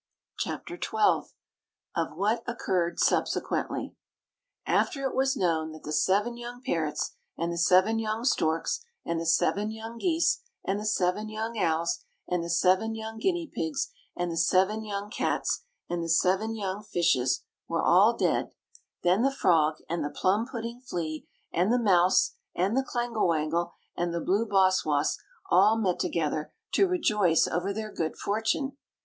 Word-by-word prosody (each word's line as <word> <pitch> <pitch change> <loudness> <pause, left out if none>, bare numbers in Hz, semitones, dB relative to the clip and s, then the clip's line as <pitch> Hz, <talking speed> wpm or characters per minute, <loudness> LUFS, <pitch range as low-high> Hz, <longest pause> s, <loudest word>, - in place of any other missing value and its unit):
CHAPTER - - -4
XII 425 -2 +2 0.7
OF - - -1
WHAT 215 +4 +1
OCCURRED 185 -7 -1
SUBSEQUENTLY - - 0 0.7
After 275 -1 +1
it 265 - -1
was 265 +1 +2
known 160 -4 0
that 155 - -12
the 150 - -4
seven 205 +8 +2
young 240 +1 -7
parrots, 160 - -1 0.2
and 170 +1 -1
the - - -4
seven 185 +6 +4
young 220 +1 -2
storks, 165 - +1 0.2
and 170 -1 -1
the 165 - -3
seven 190 +5 +2
young 225 +1 -7
geese, 340 - +2 0.2
and 195 +1 0
the 210 - -3
seven 210 +2 0
young 220 +2 -4
owls, 165 -4 0 0.2
and 180 -1 0
the 170 - -5
seven 185 +6 +2
young 220 0 -6
guinea 345 +1 0
pigs, 160 - -3 0.3
and 175 -1 -1
the 165 - -4
seven 190 +6 +2
young 205 0 -5
cats, 480 - -1 0.2
and 175 -1 -2
the 165 - -4
seven 190 +7 +2
young 200 -1 -3
fishes, 160 -11 +1 0.2
were - - -1
all - - +5
dead, - - +1 0.5
then 180 +4 +3
the 270 - +4
frog, 160 - +3
and 170 +1 -2
the 145 - -2
plum 205 +9 +1
pudding 235 -1 -5
flea, 165 -10 -4 0.3
and 180 +6 +2
the 245 - +4
mouse, 185 -6 +4 0.2
and 190 +6 +1
the 265 - +3
clangle 240 -5 -1
wangle, 165 +1 0 0.2
and 170 0 -1
the - - 0
blue 200 +7 +1
boss 190 -2 +3
woss 150 0 +1 0.3
all 200 +5 +6
met 190 -5 0
together 155 -2 -1 0.2
to 390 - +4
rejoice 210 - +3
over 175 +4 -1
their 215 +1 -4
good 160 -4 -3
fortune. 225 +7 -1
195 Hz, 160 wpm, -28 LUFS, 170-225 Hz, 0.7 s, all